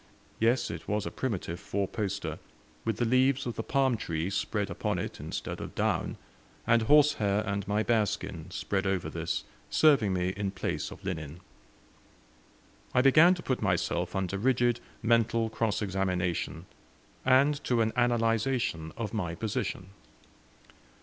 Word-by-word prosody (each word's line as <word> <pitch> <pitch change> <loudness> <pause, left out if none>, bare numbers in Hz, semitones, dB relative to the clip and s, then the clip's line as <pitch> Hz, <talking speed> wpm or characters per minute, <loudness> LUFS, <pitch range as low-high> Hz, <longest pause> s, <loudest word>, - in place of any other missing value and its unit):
Yes, 120 +2 +2
it - - -8
was 105 -1 -1
a - - -4
primitive 95 -8 -3
four 100 -1 -2
poster, 100 -1 -3 0.5
with 115 -2 0
the 120 - +1
leaves 130 +3 +3
of 120 - -2
the - - -2
palm 135 0 +2
tree 85 -2 -2
spread 100 +1 -1
upon - - -1
it - - -4
instead - - -5
of - - -7
down, - - 0 0.5
and 115 0 +4
horsehair 110 -6 +4
and 100 -1 -2
my 105 +2 +1
bearskin 105 -6 -1
spread 95 +2 -2
over 95 -2 -1
this - - -2 0.3
serving 140 -10 +4
me 90 -1 0
in 100 +1 -2
place 95 0 -3
of - - -12
linen. 80 -4 -4 1.6
I 125 - +5
began 155 +7 +7
to 175 - -9
put 130 - -1
myself 90 -2 0
under 95 0 -1
rigid 120 0 +2 0.2
mental 115 0 +2
cross 110 -1 0
examination, 90 -3 -1 0.6
and 140 +3 +4
to 120 -2 +2
an 110 0 +1
analyzation 115 -7 +1
of 110 -2 -4
my 90 -6 -2
position. 95 -2 -3
110 Hz, 145 wpm, -29 LUFS, 95-120 Hz, 1.6 s, began